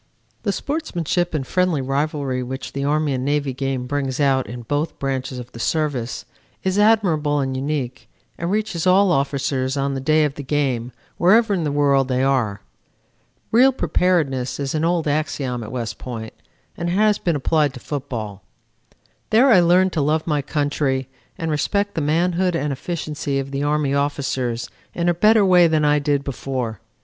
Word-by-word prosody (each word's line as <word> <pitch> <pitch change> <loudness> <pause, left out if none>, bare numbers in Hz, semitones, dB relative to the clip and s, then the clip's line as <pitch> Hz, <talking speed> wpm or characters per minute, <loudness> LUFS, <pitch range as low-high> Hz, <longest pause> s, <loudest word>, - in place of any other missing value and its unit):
"The 200 - 0
sportsmanship 180 - -2
and 135 -3 -1
friendly 180 -1 +1
rivalry 135 -1 -1
which 130 +2 -6
the 140 - -3
Army 150 0 +1
and 130 -1 -2
Navy 145 -1 0
game 135 -1 -2
brings 135 0 -2
out 135 -4 +2
in 120 +3 -7
both 145 +6 -2
branches 135 -1 -3
of 125 0 -8
the 115 - -10
Service 135 -4 -1 0.4
is 190 +1 +1
admirable 175 -9 +3
and 135 -1 -1
unique 135 -2 -3 0.3
and 170 - -3
reaches 195 -4 -1
all 190 +1 +5
officers 135 -2 0
on 140 0 0
the 135 - -2
day 155 +3 +3
of 145 - -2
the 145 - -7
game 130 -4 -1 0.3
wherever 215 +4 +4
in 175 -5 0
the 145 - 0
world 140 -2 +3
they 130 0 0
are. 120 -7 +1 0.9
Real 255 +4 +6
preparedness 155 - 0
is 140 -1 -2
an 155 0 0
old 170 -1 +1
axiom 145 -4 -1
at 110 - -7
West 120 -3 -4
Point 115 -3 -6 0.4
and 170 0 -3
it - - -1
has 210 +1 +3
been 170 -3 0
applied 150 +1 +1
to - - -8
football. 120 -9 -5 0.9
There 245 +5 +5
I 195 - +7
learned 180 +2 +4
to 155 - 0
love 155 +2 +1
my 150 -3 0
country 140 -2 -1 0.3
and 165 -1 -2
respect 200 +7 0
the 160 - -2
manhood 175 +4 +1
and 150 -3 -1
efficiency 150 -2 -3
of 135 0 -3
the 140 0 -2
Army 145 -1 +1
officers 135 -4 -1 0.3
in 175 0 +1
a - - +3
better 210 +4 +4
way 180 -2 +6
than 155 -2 +2
I 150 0 +4
did 145 -1 0
before. 130 -5 -4
145 Hz, 180 wpm, -21 LUFS, 135-170 Hz, 0.9 s, I